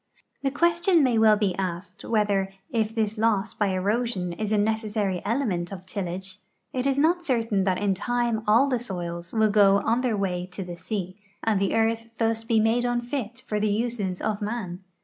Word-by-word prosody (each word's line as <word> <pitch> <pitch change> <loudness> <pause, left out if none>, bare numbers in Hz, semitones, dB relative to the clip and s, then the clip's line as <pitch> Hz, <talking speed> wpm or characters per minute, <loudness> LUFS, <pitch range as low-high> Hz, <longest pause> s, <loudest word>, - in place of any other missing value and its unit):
The 275 - +1
question 340 +3 +3
may 245 -4 +3
well 215 -1 +6
be 200 -4 0
asked 180 0 -4
whether, 205 -3 +1 0.2
if 225 -1 0
this 220 -1 0
loss 220 -1 +1
b}^ 205 -2 0
erosion 200 -2 -1
is 215 +3 -3
a 215 - +3
neces.sary 210 -3 0
element 205 -7 -1
of 185 -2 -8
tillage, 190 0 -4 0.3
it 255 +1 0
is 275 -1 +1
not 340 +4 +3
certain 225 - +1
that 185 -2 +2
in 200 0 +1
time 240 +2 0
all 230 +6 +5
the 255 -3 0
soils 175 -6 -5
will 220 -2 +3
go 200 -1 +6
on 230 +3 +2
their 240 -4 0
way 180 -2 -1
to 195 - -4
the 175 -1 -7
sea, 185 +1 -5 0.2
and 215 -3 +2
the 195 - +1
earth 225 0 +1
thus 225 0 0
be 225 -1 +2
made 225 +3 +2
unfit 245 0 -2
for 210 -3 -1
the 215 0 +1
uses 210 -4 -1
of 215 0 -1
man. 205 -5 -3
215 Hz, 190 wpm, -26 LUFS, 195-235 Hz, 0.3 s, well